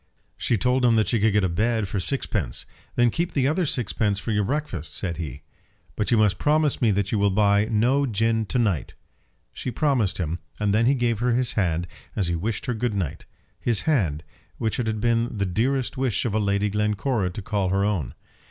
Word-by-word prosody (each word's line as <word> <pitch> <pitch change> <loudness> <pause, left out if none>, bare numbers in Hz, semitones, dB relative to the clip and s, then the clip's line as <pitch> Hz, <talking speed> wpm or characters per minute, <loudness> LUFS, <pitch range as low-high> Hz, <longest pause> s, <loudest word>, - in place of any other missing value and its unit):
She 115 - +1
told 125 +4 +1
him 120 -2 +5
that 110 -1 +2
she 115 - +2
could 105 0 +3
get 105 -1 +3
a - - +3
bed 110 +4 0
for 100 +1 -2
sixpence. 95 - -2 0.3
"Then 120 -1 +4
keep 170 +7 -2
the 135 -2 +2
other 165 +3 +1
sixpence 110 -5 0
for 110 +3 -3
your 105 -1 +1
breakfast," 95 - -3
said 85 -5 -3
he. 75 -4 -6 0.5
"But 105 - -1
you 120 - +4
must 105 -4 +3
promise 150 -1 +2
me 115 - +4
that 100 -1 0
you 110 - +1
will 100 0 +3
buy 100 +1 +3
no 125 +6 +2
gin 110 0 0
to 125 - -1
night." 100 - 0 0.6
She - - -4
promised 125 -5 +1
him, 85 -1 -2 0.2
and 105 -1 +1
then 115 +2 +3
he 140 - +4
gave 120 -4 0
her 120 0 +2
his 125 0 +1
hand 85 -4 0 0.3
as 95 -4 0
he 85 - 0
wished 100 +5 -3
her 125 - -1
good 115 -1 -1
night; 85 -4 -3 0.3
his 115 -4 +1
hand, 90 - 0 0.3
which 110 +1 -2
it 120 - -1
had 110 -1 -2
been 115 -1 +1
the 100 - 0
dearest 125 +9 0
wish 130 -5 0
of 115 - -1
Lady 100 -1 +1
Glencora 105 0 0
to 90 - -6
call 100 -2 -1
her 100 +2 +1
own. 95 -11 -2
110 Hz, 215 wpm, -24 LUFS, 100-120 Hz, 0.6 s, him